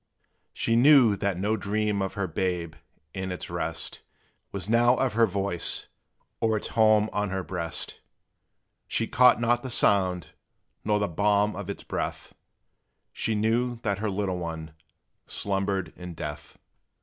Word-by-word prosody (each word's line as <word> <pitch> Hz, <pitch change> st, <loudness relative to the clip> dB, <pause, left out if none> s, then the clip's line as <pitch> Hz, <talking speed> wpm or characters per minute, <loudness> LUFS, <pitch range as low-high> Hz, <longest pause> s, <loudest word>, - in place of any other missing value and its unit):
She 115 Hz, -, 0 dB
knew 125 Hz, -4 st, +6 dB
that 100 Hz, -3 st, -1 dB
no 105 Hz, +4 st, 0 dB
dream 105 Hz, 0 st, -1 dB
of 95 Hz, 0 st, -3 dB
her 100 Hz, -2 st, -1 dB
babe, 90 Hz, -3 st, -2 dB, 0.4 s
in 95 Hz, 0 st, -4 dB
its 90 Hz, -, -6 dB
rest, -, -, -3 dB, 0.5 s
Was 100 Hz, -2 st, -4 dB
now 120 Hz, +2 st, +4 dB
of 130 Hz, -5 st, 0 dB
her 115 Hz, +1 st, +4 dB
voice, 95 Hz, -3 st, 0 dB, 0.5 s
or 110 Hz, -1 st, +2 dB
its -, -, -4 dB
home 110 Hz, -1 st, +4 dB
on 105 Hz, -1 st, -1 dB
her 95 Hz, 0 st, -2 dB
breast; 85 Hz, -3 st, -3 dB, 0.9 s
She 115 Hz, -, 0 dB
caught 125 Hz, +1 st, +5 dB
not 120 Hz, +1 st, +2 dB
the 130 Hz, -, -6 dB
sound 95 Hz, -7 st, +2 dB, 0.5 s
nor 105 Hz, 0 st, +2 dB
the 105 Hz, 0 st, 0 dB
balm 105 Hz, +3 st, +1 dB
of 100 Hz, 0 st, -6 dB
its 100 Hz, -, -5 dB
breath: -, -, -4 dB, 0.8 s
She 110 Hz, -, -1 dB
knew 115 Hz, +3 st, +1 dB
that 100 Hz, -2 st, -1 dB
her 110 Hz, 0 st, -1 dB
little 95 Hz, -2 st, -2 dB
one 80 Hz, -2 st, -6 dB, 0.5 s
slumbered 95 Hz, -3 st, -2 dB
in 90 Hz, -1 st, -8 dB
death! 75 Hz, -2 st, -7 dB
100 Hz, 150 wpm, -27 LUFS, 95-110 Hz, 0.9 s, knew